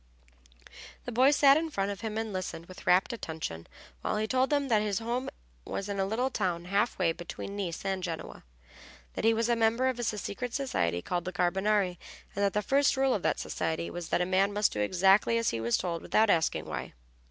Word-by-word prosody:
The 245 - -4
boys 260 +5 +5
sat 280 0 +6
in 325 +1 -1
front 200 -8 -1
of 200 - -7
him, 220 -1 -4
and 220 -2 -3
listened 185 -3 -4
with 185 +1 -13
rapt 185 +7 +4
attention 160 - -6 0.3
while - - -1
he 215 - 0
told 255 +3 +1
them 285 -2 +1
that 220 -4 +3
his 205 -2 -1
home 240 +4 -2 0.3
was 200 - -4
in 200 -1 -3
a 195 - +1
little 245 +6 0
town 180 -6 -1
half 200 +5 0
way 175 -3 +2
between 175 +4 -7
Nice 190 -3 -4
and 190 -1 -1
Genoa, 170 -3 -6 0.7
that - - -3
he 225 - +6
was 230 +1 +1
a 240 - +3
member 230 +3 +2
of 250 -2 -3
a - - -2
secret 220 +2 -3
society 85 - -1
called 175 -1 -2
the 185 - -3
Carbonari, 185 +1 +1 0.4
and 200 - 0
that 200 - +2
the 210 - 0
first 280 +4 +3
rule 265 -1 +3
of 200 - -1
that - - 0
society 160 +1 -3
was 175 -2 -6
that - - +1
a - - +2
man 190 +2 +2
must 205 0 +2
do 105 - -3
exactly 190 - +4
as 230 - +1
he 115 - -3
was 115 +1 +2
told 170 -2 -3
without 215 -1 +3
asking 160 -1 +1
why. - - -5
200 Hz, 220 wpm, -29 LUFS, 180-230 Hz, 0.7 s, sat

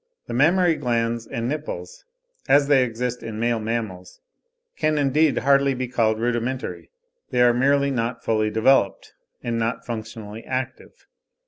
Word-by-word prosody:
The - - -6
mammary 170 +7 +4
glands 115 -3 -1
and 115 0 -3
nipples, 155 - -5 0.4
as 145 0 +5
they 140 -3 +5
exist 125 +1 -3
in 110 -1 -6
male 120 0 +1
mammals, 110 -5 -4 0.6
can 155 0 +1
indeed 145 +2 +2
hardly 140 -1 +3
be 130 0 -3
called 110 -3 +1
rudimentary; 120 +2 -2 0.4
they - - -1
are 120 0 +5
merely 140 +3 +2
not 115 -2 -2
fully 110 -1 +1
developed, 110 -1 +2 0.3
and 115 -1 -1
not 115 0 -2
functionally 110 -1 -7
active. 130 -1 -5
120 Hz, 140 wpm, -23 LUFS, 115-140 Hz, 0.6 s, as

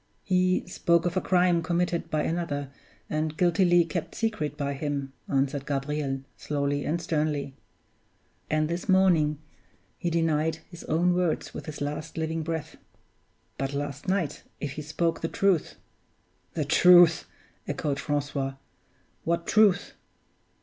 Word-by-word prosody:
"He 185 -1 +2
spoke 170 0 +2
of 175 0 -1
a 185 - +2
crime 180 -2 +3
committed 170 +1 -1
by 155 -1 0
another, 145 -5 -2 0.4
and 155 0 -2
guiltily 175 -1 +4
kept 170 -1 -4
secret 215 -10 -2
by 140 0 -1
him," 140 -1 -3 0.2
answered 140 +1 0
Gabriel, 140 -1 -2 0.2
slowly 145 -1 -1
and 165 +3 0
sternly. 150 -5 -1 1.0
"And 155 0 +1
this 170 +3 -4
morning 175 -6 +4 0.6
he 175 - -1
denied 160 -1 +1 0.2
his 170 - -10
own 175 +3 +2
words 180 -2 -1
with - - -7
his 150 -2 -7
last 150 +3 -4
living 160 0 -1
breath. 160 -1 -4 0.8
But 135 +1 -2
last 145 +5 -4
night, 185 -6 0 0.2
if 145 - -3
he 150 - -6
spoke 165 +2 -1
the 165 - 0
truth 190 -2 +1 0.4
" - - -41
"The 155 - 0
truth!" 175 +2 +6 0.4
echoed 140 -2 -2
Francois. 145 -2 -2 0.7
"What 170 0 0
truth?" 205 -4 +3
160 Hz, 135 wpm, -27 LUFS, 145-175 Hz, 1.0 s, truth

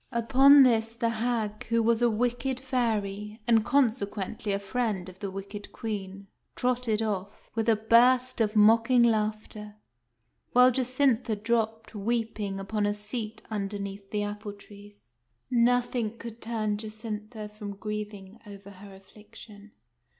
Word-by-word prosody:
Upon 270 +4 +6
this 225 -2 +2
the 230 -1 0
hag, 225 -2 -2
who 230 0 +1
was 230 +1 +2
a 240 - +4
wicked 245 +3 -1
fairy, 215 -5 -2
and, 225 -2 +4
conse 255 -3 +2
quently, 205 +1 -5
a - - 0
friend 200 -2 -2
of 185 0 -12
the 200 - -4
wicked 195 +2 -8
Queen, 200 -3 -6 0.3
trotted 245 -3 0
off, 200 -1 -5
with 225 0 0
a 225 - +5
burst 245 +3 +4
of 215 0 0
mocking 230 +3 +5
laughter; 215 -1 -1 0.8
while 250 +1 +7
Jacintha 255 -2 +1
dropped, 225 +1 -2
weeping, 215 -2 -2
upon 205 +1 -1
a 205 - -1
seat 215 +1 -5
underneath 200 -1 -4
the 210 -1 -1
apple 205 0 -5
trees. 205 - -16 0.4
Nothing 240 -2 +1
could 235 0 -9
turn 215 -2 -2
Jacintha 215 0 -7
from 210 -1 -8
grieving 210 0 -6
over 200 0 -11
her 195 0 -13
affliction. 210 +1 -15
215 Hz, 135 wpm, -28 LUFS, 205-235 Hz, 0.8 s, while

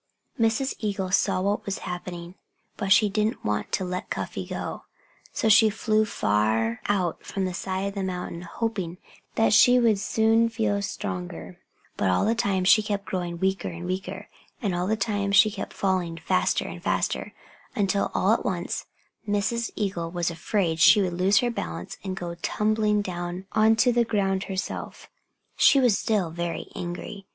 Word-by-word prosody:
Mrs. 230 +4 +1
Eagle 195 -3 -2
saw 185 -1 +2
what 200 +2 0
was 200 - -3
happening. 175 -1 -6 0.4
But 200 -2 -3
she 210 +2 +6
didn't 210 +2 -1
want 105 0 -1
to 190 - 0
let 180 0 -4
Cuffy - - -4
go. - - -5 0.5
So - - -1
she 220 +1 +7
flew 215 0 +1
far 110 - 0
out 185 -4 0
from 195 -1 -3
the 185 - -3
side 190 +1 -3
of - - -9
the 200 - -3
mountain, 180 -2 -4
hoping 185 -2 -3 0.4
that 225 -1 +3
she 245 +2 +7
would 225 -4 +3
soon 225 +2 +2
feel 220 -3 0
stronger. 90 - -5 0.4
But 100 - +1
all 90 - +2
the 225 - +3
time 200 -5 0
she 200 +4 +6
kept 205 -1 -3
growing 175 -2 -3
weaker 190 0 0
and 170 +1 -6
weaker. 185 +2 -4 0.3
And 200 -6 -1
all 175 +1 -1
the 220 +2 +1
time 205 -1 -1
she 200 +2 +6
kept 200 -1 -6
falling 185 -4 -1
faster 180 +3 +1
and - - -8
faster, - - -1 0.4
until 200 -1 +1
all - - +3
at - - 0
once - - -3 0.4
Mrs. 230 +3 0
Eagle 185 -5 -2
was 175 -1 -1
afraid 170 0 -1
that - - -1
she 205 - +7
would 180 -2 -2
lose 190 +3 +3
her 245 -1 0
balance 85 - -5
and 190 -1 -4
go 175 -2 -4
tumbling 210 0 +1
down 175 0 -5
onto 225 +3 +4
the 240 0 +3
ground 195 -4 0
herself. 190 0 -5 0.5
She 275 - +6
was 245 -6 +4
still 195 -6 0
very 170 0 -4
angry. 180 +3 -6
195 Hz, 175 wpm, -25 LUFS, 175-215 Hz, 0.5 s, she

